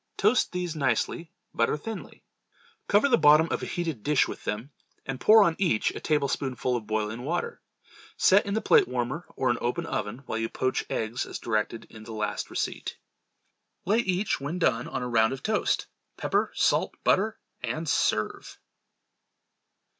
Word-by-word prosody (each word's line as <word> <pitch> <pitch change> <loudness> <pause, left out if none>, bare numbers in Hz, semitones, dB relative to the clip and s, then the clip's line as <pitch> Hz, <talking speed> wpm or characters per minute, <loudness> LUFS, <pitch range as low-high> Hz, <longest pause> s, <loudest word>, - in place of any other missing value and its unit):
Toast 215 +5 +3
these 180 -2 -3
nicely, 145 +4 -1 0.2
butter 115 +6 +1
thinly; 220 +5 -8 0.6
cover 205 +7 +4
the 240 -4 +4
bottom 150 +2 +6
of - - -1
a - - -4
heated 165 - -3
dish 150 +3 +2
with - - -8
them, 110 +7 -3 0.3
and 135 -1 -5
pour 220 0 +7
on 170 -4 +2
each 170 - +2
a - - -7
tablespoonful 135 -4 0
of 115 -3 -4
boiling 110 +2 -2
water. 175 - -3 0.6
Set 200 +2 +5
in 200 - -1
the 220 - -1
plate - - +5
warmer 125 +6 -3
or 130 -2 +1
an 120 - -2
open 165 +8 -1
oven 115 -2 -4
while 115 - -3
you 115 0 -1
poach 130 0 -1
eggs 115 +3 -2
as - - -5
directed 110 0 -2
in 110 -1 -12
the 110 +1 -8
last 105 -1 -3
receipt. - - -3 0.9
Lay 210 +5 +3
each 190 - 0
when 145 +6 -3
done 125 -9 +1
on - - -3
a - - -2
round 115 0 +3
of 135 - -8
toast, 215 -1 0 0.3
pepper, - - 0
salt - - +2
and - - -41
butter, 215 +3 +2 0.2
and 140 +7 -3
serve. - - 0
140 Hz, 170 wpm, -27 LUFS, 115-180 Hz, 0.9 s, pour